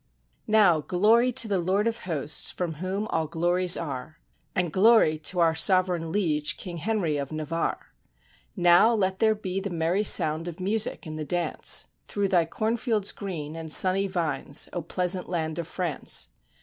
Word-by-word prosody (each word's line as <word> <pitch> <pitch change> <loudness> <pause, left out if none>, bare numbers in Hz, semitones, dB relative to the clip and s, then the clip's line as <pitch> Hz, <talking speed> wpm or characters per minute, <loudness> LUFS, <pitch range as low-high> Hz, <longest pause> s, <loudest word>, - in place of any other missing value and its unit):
] - - -44
Now 210 -7 +4
glory 220 +9 +2
to 235 -2 +1
the 200 -3 0
Lord 190 +5 0
of 230 -2 -4
Hosts, 155 -4 -1
from 175 -3 -4
whom 190 +3 -3
all 160 -1 -1
glories 175 +2 +1
are 145 -1 -6 0.4
I - - +1
And 175 -4 -1
glory 195 -6 +4
to 175 +4 -1
our 165 -1 +3
Sovereign 175 -1 +2
Liege, 155 -6 0
King 175 -2 -7
Henry 170 -4 -1
of 140 0 -5
Na 155 0 -4
varre! 165 +2 -2 0.8
Now 175 +5 +4
let 190 -2 -1
there 220 -1 +3
be 195 -2 -4
the 200 +1 -5
merry 170 +3 -1
sound 160 -4 +3
of 175 0 -8
music 205 +2 -1
and 155 -1 -7
the - - -3
dance, 175 +3 +1 0.2
Through 200 -1 -2
thy 175 -3 +2
cornfields 220 +2 -1
green, 160 -6 -7
and 160 -1 -7
sunny 190 +4 +5
vines, 160 -7 -1
oh 175 - -3
pleas 180 +3 0
ant 180 - -7
land 160 -2 -3
of 165 - -5
France! 175 -6 -2
180 Hz, 180 wpm, -25 LUFS, 160-200 Hz, 0.8 s, sunny